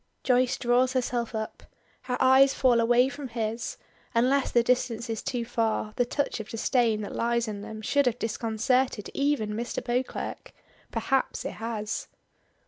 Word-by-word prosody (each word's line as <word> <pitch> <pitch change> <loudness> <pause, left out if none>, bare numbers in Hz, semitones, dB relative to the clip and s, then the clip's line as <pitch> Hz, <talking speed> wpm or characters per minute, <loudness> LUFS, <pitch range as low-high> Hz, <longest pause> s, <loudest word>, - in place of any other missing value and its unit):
Joyce 250 -1 +3
draws 250 +1 +2
herself 240 -3 -1
up. 220 0 -4 0.4
Her 250 -1 -2
eyes 265 +1 +6
fall 245 -3 +4
away 240 +2 +4
from 280 0 -6
his; 230 -1 -3 0.4
unless 260 +4 +3
the 240 - +3
distance 235 -1 0
is 225 - -3
too 240 -3 -2
far, 225 -2 -1
the 245 - +2
touch 285 0 -2
of 220 - -7
disdain 225 -1 +1
that 205 - -6
lies 235 0 +1
in 205 -2 -5
them 220 +1 -8
should 285 +5 +2
have 245 -1 +1
disconcerted 230 +1 0
even 280 -7 0
Mr. 235 +3 -3
Beauclerk. 250 +1 -3 0.4
Perhaps 270 -1 -1
it - - -2
has! 215 -2 -3
240 Hz, 155 wpm, -27 LUFS, 225-255 Hz, 0.4 s, eyes